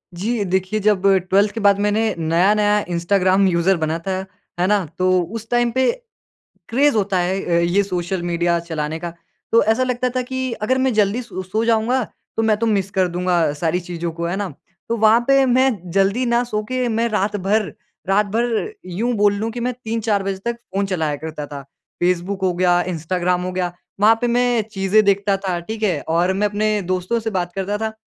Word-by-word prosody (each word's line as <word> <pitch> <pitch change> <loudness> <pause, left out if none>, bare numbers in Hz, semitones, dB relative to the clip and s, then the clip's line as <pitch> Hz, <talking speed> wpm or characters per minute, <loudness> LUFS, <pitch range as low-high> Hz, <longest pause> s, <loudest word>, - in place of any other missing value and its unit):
जी 215 +5 -1
देखिए, 190 +3 0
जब 210 -2 +2 0.3
12th 200 +2 +3
के 225 - -4
बाद 200 -1 +4
मैंने 210 +1 +1
नया-नया 200 +6 +2
इंस्टाग्राम 185 +2 +2
यूज़र 175 +2 +2
बना 160 0 -1
था, 190 - 0 0.4
है 180 - +3
ना? 200 -3 +2
तो 185 0 +3
उस 220 +5 -7
टाइम 240 -1 +2
पे 260 +1 +2 0.8
क्रेज़ 280 +2 +3
होता 200 -2 +1
है 185 +2 0
अ, 170 -1 +1
ये 180 +4 +2
सोशल 180 -1 -3
मीडिया 170 0 +1
चलाने 155 -1 -3
का। 170 -1 -6 0.4
तो 230 - +5
ऐसा 225 +4 +2
लगता 250 0 -1
था 255 - +1
कि 260 0 -3
अगर 260 +5 +1
मैं 260 -1 +1
जल्दी 215 +3 +2
सो 230 -5 -7
सो 215 +5 -2
जाऊँगा 230 +3 +2 0.3
तो 225 - +2
मैं 215 -1 +2
तो 230 - -1
मिस 200 -3 0
कर 190 -2 +2
दूँगा 175 -2 +1
सारी 165 +3 -1
चीज़ों 170 -1 -5
को, 170 +1 -5
है 175 +2 -1
ना? 200 -2 -3 0.4
तो 230 - 0
वहाँ 220 +2 +5
पे 275 0 +5
मैं 260 +1 +3 0.2
जल्दी 195 +7 +2
ना 235 0 +2
सो 215 -3 -2
के 255 -1 0
मैं 230 +1 +1
रात 205 0 0
भर, 205 +2 0 0.3
रात 200 +2 +3
भर 240 - 0
यूँ 215 +7 -2
बोल 205 -1 +3
लूँ 220 +3 -2
कि 240 - -6
मैं 250 +1 -1
3-4 225 -4 -2
बजे 195 -1 -2
तक 235 - -1 0.2
फ़ोन 200 0 0
चलाया 160 -6 -1
करता 155 0 -6
था। 140 -1 -7 0.4
फ़ेसबुक 180 +2 0
हो 185 -1 +2
गया, 175 0 +3
इंस्टाग्राम 180 +1 -1
हो 185 - -3
गया, 180 -1 -2 0.3
वहाँ 220 +2 +6
पे 245 - +1
मैं 245 -1 +2
चीज़ें 195 +2 +3
देखता 200 0 +2
था, 185 -3 -2
ठीक 220 +5 -6
है? 195 - +1
और 175 +3 +2
मैं 205 +2 +1
अपने 210 0 0
दोस्तों 185 +6 0
से 225 0 -3
बात 180 -4 -2
करता 195 +2 -2
था। 220 +1 -2
200 Hz, 205 wpm, -20 LUFS, 180-225 Hz, 0.8 s, वहाँ